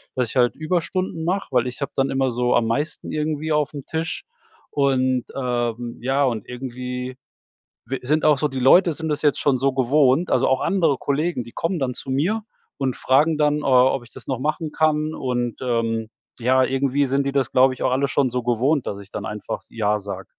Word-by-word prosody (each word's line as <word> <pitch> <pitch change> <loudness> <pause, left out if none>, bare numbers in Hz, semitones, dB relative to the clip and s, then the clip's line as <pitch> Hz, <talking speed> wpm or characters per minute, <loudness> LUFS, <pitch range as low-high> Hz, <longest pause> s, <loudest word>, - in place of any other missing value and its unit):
dass 125 -3 0
ich - - -8
halt 125 -2 +3
Überstunden 170 +1 -2
mach, 185 +2 -1
weil 125 -1 +2
ich 125 +3 -6
hab 140 - -3
dann 135 0 +1
immer 135 -1 +1
so 125 +1 +1
am 115 - +3
meisten 145 +8 -2
irgendwie 155 0 -2
aufm 150 -2 -1
Tisch 160 +2 -3 0.5
und, 130 -3 +1
ähm, 120 -2 -2
ja, 135 +3 +1
und 115 -5 -2
irgendwie 125 0 -5 0.7
w 135 - -3
sind 150 +4 +1
auch 150 -2 +5
so 150 - +1
die 135 -2 -5
Leute 170 +7 +6
sind 160 +1 -4
das 150 -1 -1
jetzt 150 -2 +2
schon 135 -3 +2
so 135 +1 +2
gewohnt, 135 +4 +3
also - - +3
auch 130 - +2
andere 165 -8 +2
Kollegen, 145 +1 -1
die 120 - -12
kommen 165 +7 -2
dann 130 -2 -1
zu 130 - -5
mir 175 +12 0 0.3
und 135 -2 -1
fragen 150 +4 +3
dann, 150 -1 +2
äh, - - -7
ob 130 -1 +4
ich 115 - -18
das - - -12
noch 130 -3 -2
machen 155 +3 -2
kann 155 0 +1
und, 125 -5 -2
ähm, 115 -3 -1 0.3
ja, 130 +2 +3
irgendwie 135 +2 +1
sind 135 +1 0
die 140 - 0
das, 135 -4 0
glaube 130 +1 +5
ich, 130 - -6
auch - - +2
alle 135 +2 +1
schon 135 0 +1
so 125 0 -2
gewohnt, 125 +4 +1
dass 100 - -4
ich 100 0 -13
dann - - -5
einfach 105 0 -5
„ja“ 105 -2 0
sag. 100 0 -7
135 Hz, 210 wpm, -22 LUFS, 125-150 Hz, 0.7 s, Leute